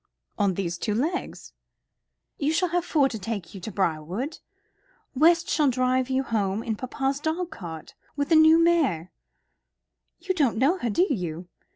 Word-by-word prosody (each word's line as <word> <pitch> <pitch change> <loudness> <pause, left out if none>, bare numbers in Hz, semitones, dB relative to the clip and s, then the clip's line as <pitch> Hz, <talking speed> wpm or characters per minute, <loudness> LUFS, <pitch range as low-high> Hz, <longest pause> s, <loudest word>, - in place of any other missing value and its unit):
"On 195 -3 +2
these 175 -3 -3
two 210 - -1
legs." 320 +10 -3 0.9
"You 295 +2 +1
shall 360 +2 +1
have 350 +1 0
four 295 -5 +2
to 225 -5 -6
take 200 -3 -5
you 195 - -9
to 215 - -6
Briarwood. 185 - -2 0.7
West 330 +5 +4
shall 295 -2 +2
drive 255 0 +1
you 265 +1 +1
home 215 -4 -1
in 225 - -2
papa's 270 +4 -2
dog 325 +3 -2
cart, 165 - -9 0.2
with 285 0 -2
the 330 - +5
new 315 +1 +7
mare. 310 - +2 1.1
You 380 - -2
don't 285 -11 +1
know 295 +10 +2
her, 240 - -1
do 345 - +3
you? 175 - -4
260 Hz, 165 wpm, -25 LUFS, 195-315 Hz, 1.1 s, new